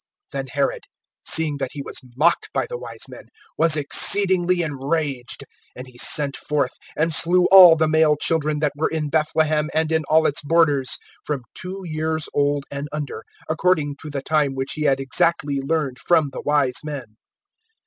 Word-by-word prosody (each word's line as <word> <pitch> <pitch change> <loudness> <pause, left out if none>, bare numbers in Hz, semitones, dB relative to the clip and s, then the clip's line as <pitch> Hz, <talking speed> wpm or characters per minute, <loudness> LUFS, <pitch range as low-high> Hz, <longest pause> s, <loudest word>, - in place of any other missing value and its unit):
(16)Then - - -4
Herod, - - -1 0.4
seeing 155 -3 +1
that 135 -2 -5
he 140 - -6
was - - -6 0.2
mocked 170 +4 +2
by - - 0
the 485 - -7
wise - - -8
men, - - -12 0.3
was 160 -1 +4
exceedingly 180 +3 +3
enraged; 140 -3 -3 0.3
and 125 - -8
he 125 -1 -15
sent 140 +1 +1
forth, 140 -4 -1 0.3
and 160 +1 +1
slew 175 +4 +4
all 185 -4 +10
the 160 0 +1
male 155 -1 +3
children 155 0 0
that 150 -2 +1
were 150 - -1
in 155 -2 -3
Bethlehem, 155 0 0
and 160 0 0
in 160 -1 +1
all 160 0 +4
its 145 - +1
borders, 145 -4 +1 0.3
from 145 -4 -4
two 190 +1 -7
years 160 -1 -2
old 145 -1 0
and 140 +1 -5
under, 150 -2 -5 0.2
according 155 -3 0
to 155 - -8
the 140 -2 -5
time 150 -3 0
which 135 0 -3
he 155 - -6
had 135 -2 +2
exactly 140 +1 0
learned 140 -3 -2
from 160 -5 +2
the - - -7
wise 145 -4 +1
men. 135 -8 -7
150 Hz, 175 wpm, -21 LUFS, 140-160 Hz, 0.4 s, all